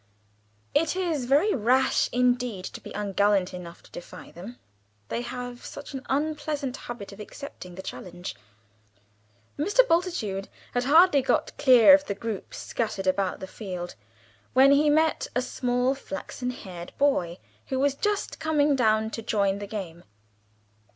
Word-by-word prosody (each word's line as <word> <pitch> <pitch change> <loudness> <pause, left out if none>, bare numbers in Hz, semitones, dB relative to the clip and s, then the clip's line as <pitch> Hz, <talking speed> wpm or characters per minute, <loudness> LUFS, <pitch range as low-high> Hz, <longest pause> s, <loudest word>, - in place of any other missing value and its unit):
It 325 +2 +2
is 335 -8 -1
very 295 - +3
rash 255 +3 +2
indeed 245 -5 +1
to - - -7
be - - -10
ungallant 200 -2 +1
enough 175 -2 -9
to - - -19
defy 175 - -10
them 200 +8 -10 0.5
they 235 - -2
have 245 0 -6
such 285 0 -9
an 265 -1 -5
unpleasant 290 -1 -1
habit 235 -7 -8
of 200 - -12
accepting 210 -5 -9
the 190 - -8
challenge. 175 -9 -7 1.2
Mr. 415 +11 +4
Bultitude 330 - 0 0.2
had 245 0 0
hardly 315 +1 +6
got - - 0
clear 255 -1 +8
of 290 0 +5
the 200 - -3
groups 215 -1 -5
scattered 210 -4 -3
about 185 0 0
the - - -4
field, 180 -3 -6 0.6
when 265 +2 +7
he 295 +2 +5
met 315 +1 +2
a 250 - +2
small 250 0 0
flaxen 275 -2 -6
haired 185 -8 -8
boy, 180 -12 +1 0.3
who 265 - -2
was 280 +1 +2
just 415 +8 -2
coming 300 -2 +2
down 220 -3 +2
to 225 - -5
join 200 -3 +1
the 205 - -6
game. 180 -5 -6
245 Hz, 150 wpm, -26 LUFS, 200-285 Hz, 1.2 s, clear